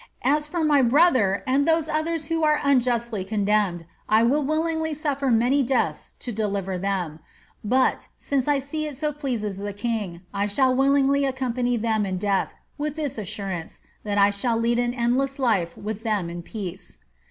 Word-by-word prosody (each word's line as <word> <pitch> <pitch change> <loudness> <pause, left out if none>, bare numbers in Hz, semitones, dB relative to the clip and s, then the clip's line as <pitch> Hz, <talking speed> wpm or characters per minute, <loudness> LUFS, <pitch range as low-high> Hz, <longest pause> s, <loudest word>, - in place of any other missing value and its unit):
As 295 +3 +2
for 335 +1 -2
my 295 -2 +4
brother 255 - +3
and 275 +3 +2
those 325 -1 +2
others 315 0 -1
who 325 +1 -1
are 300 -1 +3
unjustly 240 -6 +1
condemned, 200 -3 0 0.2
I 220 +1 +5
would 275 +4 +2
willingly 320 0 0
suffer 280 -2 -1
many 245 +4 +3
deaths 260 0 -1
to 245 - -3
deliver 200 -4 -2
them; 180 -5 -2 0.4
but, 255 +5 +1
since 275 -2 -1
I 290 -1 +3
see 305 +3 -3
it 290 -3 -7
so 300 +1 -1
pleases 240 -9 -3
the 205 0 -4
king, 205 -5 -3
I 200 +1 0
shall 255 +5 +2
willingly 275 +1 +3
accompany 255 -2 0
them 220 -2 0
in 185 -1 -2
death, 200 0 0 0.2
with 300 0 -2
this 295 -7 -3
assurance, 190 -4 -5 0.2
tliat 205 -1 -2
I 200 0 +5
shall 225 +3 0
lead 235 +1 +1
an 245 0 0
endless 260 +3 0
life 200 -11 0
with 215 +1 -5
them 210 -7 -1
in 175 0 -6
peace." 190 -1 -7
245 Hz, 175 wpm, -24 LUFS, 205-280 Hz, 0.4 s, I